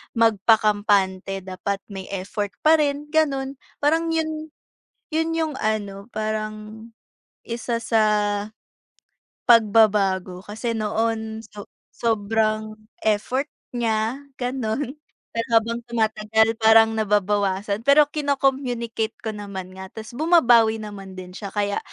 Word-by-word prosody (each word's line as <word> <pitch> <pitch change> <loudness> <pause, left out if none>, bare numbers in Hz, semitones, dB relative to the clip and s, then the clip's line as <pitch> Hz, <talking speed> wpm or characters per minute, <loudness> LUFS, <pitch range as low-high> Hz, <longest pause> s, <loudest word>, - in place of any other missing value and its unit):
magpakampante 205 -3 +2
dapat 195 +1 -4
may 195 -1 -7
effort 200 +2 -3
parin 295 -2 +3
ganun. 275 -4 0 0.2
Parang 325 +3 +2
yun, 315 -1 -3 0.6
yun 320 +1 0
yung 320 -2 -1
ano 205 -2 -2
parang 215 +1 -4 0.6
isa 235 0 -2
sa 225 -1 +2 1.5
pagbabago, 205 -5 +4
kasi 225 +2 -3
noon 220 +1 -1
so 210 -2 -11 0.3
sobrang 215 -1 0 0.3
effort 250 +7 0 0.3
niya 230 +3 -1 0.2
ganun, 255 +2 -2 0.3
pero 230 0 -2
habang 230 +1 -4
tumatagal 220 -1 +1
parang 225 0 +6
nababawasan. 205 -1 0
Pero 290 +2 +8
kino-communicate 265 -6 -1
ko 220 - -2
naman 200 -3 -7
nga, 190 0 -8
tas 220 0 -9
bumabawi 240 -6 +4
naman 195 -3 -8
din 180 -1 -9
siya. 200 +1 -7
Kaya 205 -1 -1
220 Hz, 105 wpm, -23 LUFS, 205-245 Hz, 1.5 s, Pero